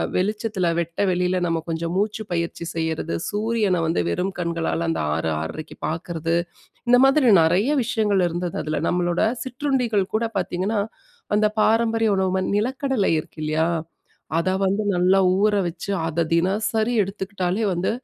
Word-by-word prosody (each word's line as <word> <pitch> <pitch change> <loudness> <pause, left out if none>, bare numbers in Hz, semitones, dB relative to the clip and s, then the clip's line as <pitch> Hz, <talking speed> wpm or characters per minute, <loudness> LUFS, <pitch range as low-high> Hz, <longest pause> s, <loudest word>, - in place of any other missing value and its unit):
வெளிச்சத்தில, 205 -1 0
வெட்ட 170 0 -4
வெளியில 180 +1 +1
நம்ம 165 -1 0
கொஞ்சம் 165 +1 -2
மூச்சு 210 +2 -1
பயிற்சி 170 0 -2
செய்யிறது, 160 0 -2
சூரியன 210 -4 0
வந்து 160 - +1
வெறும் 185 - -1
கண்களால 170 -1 -1
அந்த 165 - -1
6 80 0 -1
6.30க்கு 150 - -7
பாக்குறது. 165 0 -2 0.5
இந்த 245 0 +7
மாதிரி 270 -2 +4
நிறைய 185 - +2
விஷயங்கள் 210 -5 +1
இருந்தது 175 +1 -3
அதில. 155 -1 -2
நம்மளோட 175 0 0 0.2
சிற்றுண்டிகள் 250 -6 -1
கூட 230 +1 +1
பார்த்தீங்கன்னா, 190 +3 -1 0.5
அந்த 210 0 +4
பாரம்பரிய 225 0 +2
உணவு 190 -1 +1
ம 185 - 0
நிலக்கடலை 260 0 0
இருக்கில்லையா? 155 +1 -2 0.7
அத 170 +3 +1
வந்து 195 +2 +1
நல்லா 180 +2 +4 0.2
ஊற 210 0 +3
வச்சு, 170 +4 -6 0.2
அத 165 +1 0
தினசரி 215 +6 +1
எடுத்துக்கிட்டாலே 195 +1 -2
வந்து, 175 +2 0
185 Hz, 135 wpm, -23 LUFS, 170-215 Hz, 0.7 s, இந்த